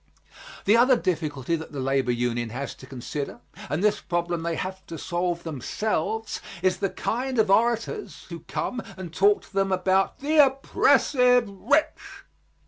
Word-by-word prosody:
The 210 - +5
other 250 +2 +5
difficulty 155 - -1
that 160 -1 -8
the 140 - -4
labor 135 -1 +1
union 120 -1 -1
has 130 +5 -5
to 130 - -14
consider, 135 +2 -5 0.3
and 150 +7 -1
this 210 -1 +2
problem 175 -1 -2
they 165 0 -2
have 190 +2 -5
to 165 - -7
solve 175 +1 -2
themselves, 210 - -2 0.2
is 185 -1 +2
the 195 - -1
kind 255 +6 -2
of 215 -3 +3
orators 235 - 0
who - - -6
come 250 - -4 0.2
and 180 -3 -8
talk 205 +3 +3
to - - -19
them 195 0 +1
about 190 +1 +1
the 295 +2 +5
oppressive 250 -2 +3
rich. 285 +10 -1
185 Hz, 155 wpm, -25 LUFS, 155-230 Hz, 0.3 s, The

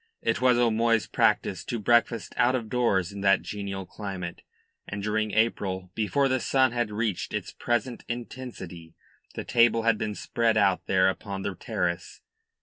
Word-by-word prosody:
It - - 0
was 125 -1 +5
O'Moy's 115 -1 +3
practice - - +1
to 120 - -2
breakfast 115 +1 +2
out 125 +2 +3
of 115 -4 -3
doors 105 -7 +1
in 100 0 -7
that 100 0 +4
genial 100 -2 -5
climate, 90 -3 -6 0.5
and 100 0 -5
during 110 +1 0
April, 95 -4 0
before 135 +6 +1
the 130 0 +1
sun 130 0 +3
had 120 -2 -1
reached 105 -3 -2
its - - -4
present 120 +1 -2
intensity, 115 -9 -7 0.4
the - - -4
table 115 -1 +3
had 115 -2 +3
been 105 -1 -2
spread 115 0 0
out 95 -3 +2
there 95 -1 +4
upon 95 0 -3
the 100 - -2
terrace. 90 -6 -3
110 Hz, 160 wpm, -27 LUFS, 95-120 Hz, 0.5 s, was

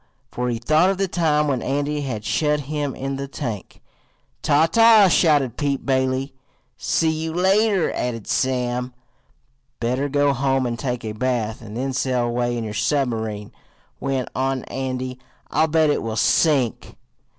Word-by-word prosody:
for 125 0 -2
he 120 - -1
thought 155 +10 +3
of 195 - 0
the 195 0 0
time 155 -4 +1
when 130 -4 0
Andy 145 +3 -1
had 115 -6 -4
shut 150 -1 +1
him 145 -1 -3
in 135 0 -4
the 140 0 -4
tank. 120 -8 -6 0.6
"Ta! 145 +3 +4
ta!" 225 +2 +6
shouted 145 -8 +3
Pete 140 -2 -1
Bailey. 130 0 0 0.4
"See 160 -1 +1
you 160 +1 -3
later," 190 +2 +2
added 115 -3 -3
Sam. 125 -1 -1 0.8
"Better 125 +4 -1
go 145 0 +2
home 135 0 +1
and 120 -1 -3
take 125 -3 -3
a 110 - -3
bath, 110 -1 -2
and 110 0 -8
then 135 +1 -2
sail 125 -1 0
away 120 0 -1
in 115 - -3
your 110 -1 -5
submarine," 110 -5 -1 0.5
went 135 -2 -2
on 130 0 -1
Andy. 130 -1 -4 0.3
"I'll 155 +1 +3
bet 160 -1 +3
it - - 0
will 110 -1 -4
sink." 135 -1 +2
135 Hz, 160 wpm, -22 LUFS, 125-150 Hz, 0.8 s, ta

